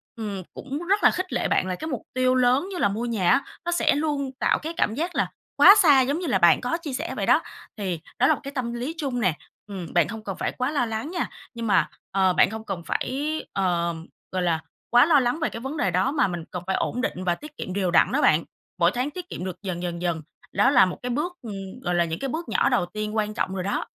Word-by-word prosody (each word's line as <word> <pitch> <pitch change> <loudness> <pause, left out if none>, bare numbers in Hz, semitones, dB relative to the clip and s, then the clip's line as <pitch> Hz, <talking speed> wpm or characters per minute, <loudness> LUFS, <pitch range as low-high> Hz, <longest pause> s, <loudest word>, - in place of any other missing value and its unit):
ừm, 205 -4 -5
cũng 280 +2 -5
rất 400 +2 +3
là - - +7
khích 370 +1 -4
lệ - - 0
bạn 185 - +1
là 185 - -2
cái 315 - -6
mục 260 -7 -3
tiêu 255 0 +2
lớn 255 +6 +3
như 370 - -4
là 260 - +3
mua 220 +4 -3
nhà 205 -7 +1
á, - - +4 0.2
nó 345 - 0
sẽ 345 - +3
luôn 290 -3 -1
tạo - - +2
cái 325 +2 -5
cảm 215 - +1
giác 340 +4 -3
là - - +2 0.3
quá 395 - +9
xa 295 -9 +6
giống 280 +6 0
như 360 - -3
là 220 -8 +2
bạn 170 -2 +5
có 255 +7 -1
chia 310 -6 -6
sẻ 325 +6 -3
vậy - - -1
đó, - - +5 0.4
thì 185 -6 -2 0.2
đó 255 - +5
là - - +5
một - - -4
cái 275 - -6
tâm 250 -4 -3
lý 250 +7 -3
chung 265 -5 -2
nè, 185 -8 +2 0.3
ừm, 190 -5 -7
bạn 175 -3 +4
hông 220 0 -7
cần 195 -3 -4
phải - - -1
quá 255 +3 -2
lo 280 -5 +1
lắng 225 +8 -4
nha. 360 - -2 0.2
Nhưng 230 -1 -4
mà, 205 - +3 0.2
ờ, 190 -2 +3
bạn - - +4
hông 220 0 -6
cần 185 -5 -4
phải, 295 +4 -2
ờ, 170 -3 0 0.4
gọi 185 - -1
là, 165 -2 +1 0.3
quá 245 +3 +6
lo 315 -4 +5
lắng 250 +4 0
về 315 - 0
cái 230 - -7
vấn 270 +5 -5
đề 190 - +1
đó, 185 - +2
mà 300 - +2
mình 175 -3 -4
cần 180 -1 -5
phải 190 - +1
ổn 250 - -1
định 185 -7 -2
và 175 -1 +1
tiết 300 0 -12
kiệm 185 - -5
đều 190 -3 0
đặn - - +4
đó - - +1
bạn, 155 +2 +4 0.4
mỗi 170 +1 +4
tháng 250 +6 -2
tiết 360 +1 -8
kiệm 180 - -5
được 185 - -4
dần 180 -3 -3
dần 170 -1 -4
dần. 170 -3 -1 0.3
Đó 205 +7 +4
là 250 -8 +6
một 180 - -4
cái 250 - -2
bước, 305 +8 -1
ừm, 195 -2 -7
gọi 175 0 0
là, 175 - +4
những 165 0 -4
cái 275 - -3
bước 330 +6 -4
nhỏ - - +2
đầu 245 -9 +2
tiên 215 +3 -5
quan 215 -1 0
trọng 190 - -2
rồi 185 - -2
đó. 200 - -1
235 Hz, 280 wpm, -25 LUFS, 185-280 Hz, 0.4 s, quá